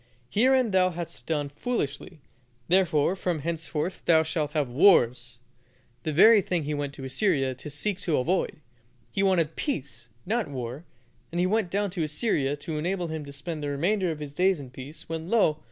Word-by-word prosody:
Herein 255 +1 +3
thou 185 -1 +4
hast 170 -8 -7
done 150 -3 -1
foolishly; 150 - -4 0.5
therefore 175 -2 +3
from 180 -3 -1
henceforth 165 +2 -3
thou 160 -2 +5
shalt 155 -2 -2
have 145 -5 0
wars" 120 -6 +4 0.6
the 155 - -2
very 210 +7 +7
thing 175 -3 -1
he 150 +1 -2
went 145 -1 -3
to 135 - -9
Assyria 135 -1 +1
to 130 +4 -9
seek 180 +7 -1
to 165 -6 0
avoid. 155 +3 0 0.5
He 195 - -1
wanted 175 -5 +2
peace, 120 - -4 0.2
not 225 +3 0
war, 130 +3 -6 0.5
and 170 - -2
he 180 - +3
went 205 0 +1
down 200 +1 -1
to 175 -3 -2
Assyria 150 - 0
to 155 +1 -5
enable 175 +1 -2
him 160 -1 -4
to 140 - -9
spend 155 +2 -5
the 145 - -2
remainder 180 +7 +1
of 160 - -3
his 145 -2 -7
days 185 +2 +2
in 130 -3 -9
peace, 135 +5 -9
when, 165 +1 -5
lo! 180 -10 +3
160 Hz, 185 wpm, -27 LUFS, 145-185 Hz, 0.6 s, very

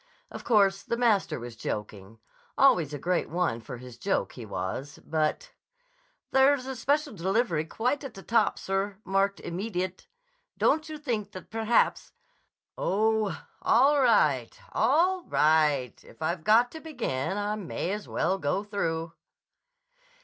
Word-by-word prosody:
Of - - -8
course 200 -4 +3
the 235 - -3
master 225 - +2
was 120 -1 -8
joking. 105 -2 -6 0.4
Always 180 - +4
a 145 - -4
great 175 +5 -1
one 170 -9 -1
for 120 - -8
his 125 -1 -12
joke, - - 0
he - - -9
was. 135 +10 -4
But— 160 - -1 0.8
"There's 265 0 +4
a 265 0 -4
special 285 +2 0
delivery 190 -3 0
quite 250 - -1
at 270 -4 -8
the 195 - -10
top, 235 - +2
sir, 195 +1 -2
marked 195 +1 +1
'Immediate.' 185 - -4 0.5
Don't 315 +1 +2
you 310 - -5
think 225 -9 -3
that 185 - -10
perhaps—" 225 +1 +1 0.6
"Oh, 215 +1 0 0.2
all 275 +4 +4
right: 150 - +2
all 340 - +2
right! 150 -5 +2
If - - -17
I've 170 +1 -1
got 230 +5 +4
to 320 - -9
begin 205 - -3
I 205 0 -1
may 185 -2 -4
as 210 +1 -4
well 190 +1 0
go 155 +6 -1
through." 165 -6 -3
200 Hz, 140 wpm, -28 LUFS, 160-240 Hz, 0.8 s, Always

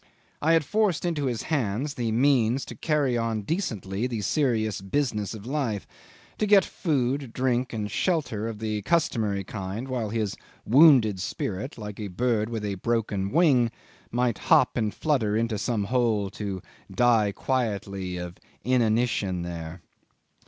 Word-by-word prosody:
I 160 +2 +3
had 165 -3 +3
forced 205 -5 +1
into 160 -5 -1
his 120 -4 -2
hand 130 -3 -1
the 120 -5 -2
means 125 0 +2
to - - -8
carry 145 -6 +1
on 115 -2 -1
decently 110 - -2
the 115 -4 -3
serious 110 -5 0
business 105 0 -1
of 105 -1 -10
life, 125 -7 -2 0.5
to 215 - +1
get 200 -3 +6
food, 135 - -1
drink, 125 -1 0
and 110 -2 -3
shelter 140 - 0
of 115 -2 -5
the 110 -1 -2
customary 110 - 0
kind 100 +5 -5
while 125 -5 -2
his 110 -2 -2 0.3
wounded 125 - +6
spirit, 100 +7 -4
like 105 -2 -7
a 105 - -3
bird 110 +2 0
with 110 -3 -3
a 100 - -2
broken 105 -5 0
wing, 140 - +4 0.4
might 120 -3 0
hop - - +4
and 110 -3 0
flutter 115 -9 +1
into 115 -2 -1
some 110 -1 0
hole 110 -3 +1
to 100 -4 -5 0.3
die 110 0 +3
quietly 100 -7 -2
of 90 +1 -7 0.2
inanition 115 -6 +1
there. 85 0 -6
115 Hz, 150 wpm, -26 LUFS, 105-130 Hz, 0.5 s, get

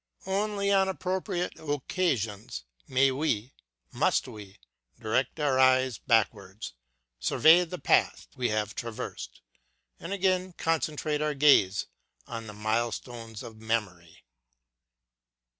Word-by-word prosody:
Only 200 +1 0
on 195 -1 +4
appro 185 0 -2
priate 180 -3 -3
occasions 125 - -2 0.2
may 135 +1 +3
we, 130 -4 -1 0.4
must - - +1
we, 100 -2 -11 0.4
direct 125 +7 -1
our 140 -3 +2
eyes 130 -3 +4
backwards, 105 - 0 0.5
survey 160 - +5
the 180 +2 -6
path - - +2
we 125 -2 0
have 110 0 -1
traversed, 105 - -6 0.6
and 170 - -7
again 185 -2 +1
concentrate 155 -2 -1
our 150 -1 0
gaze 135 -9 +4 0.4
on 115 -1 -7
the 105 - -8
milestones 115 +1 -3
of 115 -2 -10
memory. 105 -7 -3
130 Hz, 110 wpm, -28 LUFS, 110-165 Hz, 0.6 s, survey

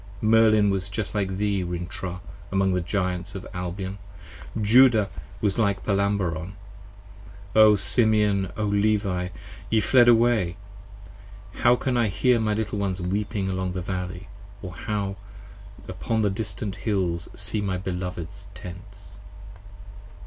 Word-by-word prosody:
Merlin 110 -1 +4
was 95 0 -2 0.2
like 95 -3 -1
thee 100 -1 0
Rintrah 90 +1 -5 0.3
among 95 -1 +2
the 90 - 0
Giants 90 0 -2
of 95 - -6
Albion, 95 +2 -5 0.6
Judah 110 -2 +5 0.3
was 105 0 0
like 100 -3 0
Palamabron: 95 -4 0 1.0
O 110 -1 +7
Simeon! 105 -2 +3
O 110 - -1
Levi! 100 -3 +1 0.4
ye 110 - +3
fled 120 +3 +5
away! 115 -6 +3 0.9
15 - - -11
How 120 0 +6
can 125 0 -1
I 120 -2 +3
hear 120 +5 +2
my 110 -1 0
little 105 -1 -2
ones 95 -2 -2
weeping 100 +2 -2
along 95 -1 -2
the 90 - -3
Valley, 90 0 -5 0.4
Or 90 -1 -6
how 100 +2 -3 0.7
upon 110 -1 -2
the 100 - +2
distant 100 0 -4
Hills 90 -6 -1
see 105 +1 0
my 95 -2 -1
beloveds' 90 +1 -6
Tents. 100 +3 -11
100 Hz, 125 wpm, -25 LUFS, 90-110 Hz, 1.0 s, O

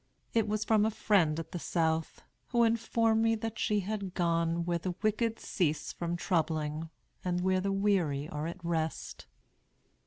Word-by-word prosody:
It 225 -2 +2
was 215 0 -1
from 215 -1 +4
a 220 - +3
friend 180 -8 +2
at 165 -1 -7
the 175 - -4
South, 160 -1 -1 0.2
who 240 -1 +3
informed 225 0 +2
me 225 0 +3
that 225 0 -5
she 210 -1 +1
had 195 -1 -4
gone 170 -1 +1
'where 170 -1 0
the 180 +1 -3
wicked 225 +1 +1
cease 155 -5 -1
from 170 0 -2
troubling, 160 -2 -1 0.3
and 180 -1 0
where 185 0 +2
the 195 +1 0
weary 185 -8 +1
are 150 0 -4
at 170 +1 -7
rest.' 160 -2 -3
180 Hz, 165 wpm, -31 LUFS, 165-215 Hz, 0.3 s, from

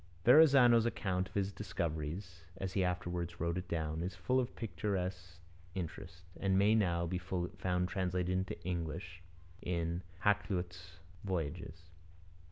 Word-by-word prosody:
Verrazano's 125 -4 +7
account 95 -5 -1
of - - -21
his 100 -1 +1
discoveries, 85 -2 -4 0.2
as 95 0 -3
he 95 - +2
afterwards 90 -1 -2
wrote 85 0 0
it 90 0 -4
down, 80 -1 -2
is 90 +1 -3
full 125 +8 +1
of 125 - -2
picturesque 95 -5 -3 0.4
interest, 90 0 -6 0.2
and 95 -1 +2
may 100 +2 +5
now 85 -6 +2
be 90 +1 -2 0.4
found 90 -1 +1
translated 90 -1 -1
into 95 0 -2
English 85 0 -4 0.4
in 85 0 -1 0.2
Hakluyt's 90 -4 0 0.3
Voyages. 85 -2 -3
90 Hz, 130 wpm, -35 LUFS, 85-100 Hz, 0.4 s, Verrazano's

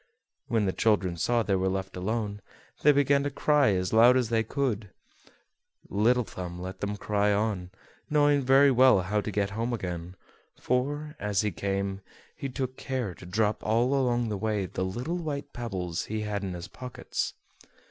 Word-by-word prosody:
When 110 -3 +1
the 95 - 0
children 100 -5 +2
saw 115 +7 +1
they 100 - 0
were 95 0 +1
left 95 0 -3
alone, 105 +2 -2 0.4
they 150 - +7
began 140 0 +3
to 145 - -1
cry 145 -4 +3
as 90 +1 -1
loud 120 +3 +7
as 125 -3 0
they 115 -1 +2
could. 115 -4 -2 1.0
Little 120 +5 +3
Thumb 90 -4 -7
let 95 +1 -6
them 105 0 -3
cry 105 0 +1
on, 100 -3 -1 0.4
knowing 145 -1 +4
very 135 +2 +5
well 125 -5 +6
how 105 +4 0
to 110 - -4
get 100 -1 -1
home 115 +4 -2
again, 90 -4 -5 0.4
for, 145 +5 -1
as 105 -2 +1
he 105 -1 0
came, 100 0 -2 0.3
he 140 -3 -5
took 130 0 -4
care 130 -8 -3
to 90 - -12
drop 105 +3 0
all 120 +5 +2
along 120 -4 +1
the 105 - -2
way 105 -2 0
the 95 - -3
little 120 - -3
white 145 -4 -4
pebbles 95 -8 -3
he 110 0 -3
had 105 -1 -3
in 95 -2 -3
his 90 0 -7
pockets. 125 -1 -5
110 Hz, 180 wpm, -28 LUFS, 95-130 Hz, 1.0 s, they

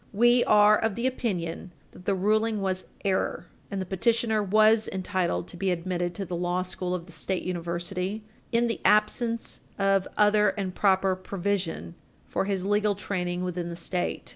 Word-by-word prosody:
We 240 +3 +5
are 210 0 +6
of 225 -3 0
the 235 - -2
opinion 185 -8 -2 0.2
that 180 - -15
the 200 - +1
ruling 215 +3 +1
was 185 -1 -1 0.2
error, 190 -2 0 0.2
and 200 - -3
that 190 - -3
petitioner 220 +2 +1
was 215 +2 +4
entitled 185 - -1
to - - -7
be 195 - 0
admitted 175 0 -2
to 195 - -3
the 175 - -4
law 175 +1 0
school 180 0 -3
of 170 -2 -6
the 175 - -14
State 185 +2 -2
University 180 +3 -3 0.3
in 235 +1 +3
the 230 -1 -2
absence 230 +2 +2 0.2
of 195 -1 +2
other 210 0 +5
and 190 -2 -2
proper 190 -1 +2
provision 185 -2 -3 0.3
for - - -1
his 190 -2 -1
legal 205 0 +2
training 180 -3 -3
within 175 -1 -3
the 170 - -5
State. 175 +1 -3
195 Hz, 170 wpm, -27 LUFS, 180-210 Hz, 0.3 s, are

